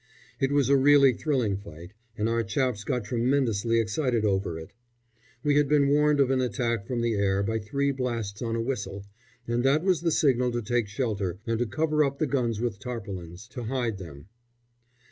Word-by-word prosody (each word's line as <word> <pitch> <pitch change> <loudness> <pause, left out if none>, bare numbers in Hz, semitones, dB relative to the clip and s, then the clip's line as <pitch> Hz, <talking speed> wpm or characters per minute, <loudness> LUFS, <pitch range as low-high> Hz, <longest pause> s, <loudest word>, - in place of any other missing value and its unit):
It 135 -1 +1
was 145 -3 +3
a 140 - +5
really 140 -1 +6
thrilling 120 -8 0
fight, 90 -2 -11 0.2
and 105 - 0
our 115 0 +1
chaps 115 0 -1
got 125 +1 -1
tremendously 115 -1 +1
excited 115 +1 0
over 95 -4 0
it. 80 0 -10 0.7
We 145 -1 +3
had 145 -1 +3
been 145 -2 +4
warned 150 0 +3
of 135 -1 +3
an 130 -1 +2
attack 115 -3 -1
from 120 -2 -2
the 115 -1 +1
air 100 -1 +1
by 110 +2 -1
three 140 +7 -1
blasts 115 -6 -3
on 115 -1 -2
a 115 - -1
whistle, 105 -5 -4 0.4
and 120 +1 0
that 140 +4 +3
was 185 -4 +2
the 170 - +1
signal 125 -5 +2
to 120 -1 -2
take 120 0 0
shelter 100 -5 -2
and 115 -1 -1
to 120 - 0
cover 155 +5 +1
up 140 -1 -1
the 155 - +1
guns 120 -6 -1
with 115 -3 -2
tarpaulins, 100 -6 -7
to 125 -3 -6
hide 120 -4 -2
them. 75 -5 -10
120 Hz, 195 wpm, -27 LUFS, 105-135 Hz, 0.7 s, really